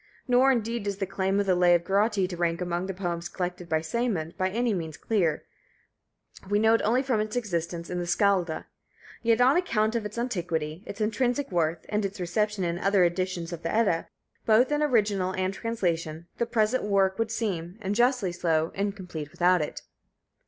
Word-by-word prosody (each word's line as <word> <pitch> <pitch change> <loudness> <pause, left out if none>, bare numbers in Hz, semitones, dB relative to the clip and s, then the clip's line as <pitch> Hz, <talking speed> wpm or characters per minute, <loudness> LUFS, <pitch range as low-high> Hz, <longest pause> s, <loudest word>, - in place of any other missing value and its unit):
Nor, 255 +2 +5
indeed, 230 -3 -1
is 200 -1 -2
the 195 - -1
claim 195 +1 0
of 200 - +1
the 190 - +3
Lay 175 -1 +5
of 170 - 0
Grotti 200 +1 +2
to 180 - -6
rank 170 -1 0
among 175 0 -2
the 195 - -3
poems 175 -2 -3
collected 180 -1 -4
by 160 0 +1
Sæmund, 175 -3 -2
by 185 0 0
any 235 +3 0
means 160 -5 -4
clear, 175 -9 0 1.0
we 205 - +3
know 220 +1 +4
it 230 - +3
only 245 +5 +2
from 255 -5 +1
its 215 +1 -2
existence 170 -7 -2
in 180 - -3
the 175 - -3
Skalda; 180 -3 +1 0.6
yet 230 -1 +3
on 255 +5 +5
account 220 -11 +1
of 230 - 0
its 210 +2 -7
antiquity, 170 -9 -2
its 200 +2 -6
intrinsic 245 +4 0
worth, 165 -2 0
and 210 +1 -1
its 195 0 -4
reception 205 +3 -1
in 170 0 -1
other 195 -1 +3
editions 175 -1 -1
of 170 - -6
the 165 - -2
Edda, 205 -7 +1 0.4
both 230 +5 +5
in 295 0 +1
original 205 -9 +2
and 185 0 -1
translation, 170 -8 -2
the 235 - +1
present 230 +1 +1
work 195 -1 +2
would 225 -1 0
seem, 195 -6 -3
and 200 -2 -2
justly 240 -4 +2
so, 165 -2 0
incomplete 190 -7 -4
without 180 +2 +3
it. 150 - -5
195 Hz, 195 wpm, -27 LUFS, 175-220 Hz, 1.0 s, Nor